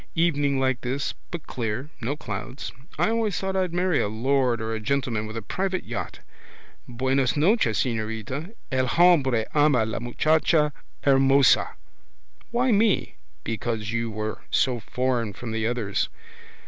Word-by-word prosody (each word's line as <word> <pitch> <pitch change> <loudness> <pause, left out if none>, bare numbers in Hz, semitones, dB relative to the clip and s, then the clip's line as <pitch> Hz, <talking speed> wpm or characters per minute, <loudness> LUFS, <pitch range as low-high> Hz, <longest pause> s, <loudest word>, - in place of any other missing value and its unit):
Evening 145 -5 +2
like 130 -2 +1
this, 130 +3 -2 0.2
but 170 -3 -6
clear, 120 +5 -4
no 130 +5 -1
clouds. 130 -2 -6 0.3
I - - +2
always 225 -3 0
thought 190 0 -2
I'd 185 -2 +1
marry 175 -2 +1
a - - 0
lord 125 +3 +1
or 110 0 -3
a - - -1
rich 110 -1 -5
gentleman 135 -4 0
coming 110 - -4
with 110 +1 -6
a 115 - -5
private 185 - -2
yacht. - - -5 0.7
Buenas 130 0 0
noches, 155 - +3
señorita. 115 - -3 0.2
El 130 0 +1
hombre 135 -7 +4
ama 145 -6 +4
la 110 - -3
muchacha 155 +4 +2 0.3
hermosa. 135 0 +4 0.7
Why 245 +2 +2
me? 210 -1 +2 0.3
Because 110 0 -3
you 115 0 -1
were 110 0 -4
so 125 -3 +2
foreign 120 -1 -1
from 115 +3 -7
the 110 0 -1
others. 115 -5 -1
130 Hz, 150 wpm, -25 LUFS, 115-155 Hz, 0.7 s, hombre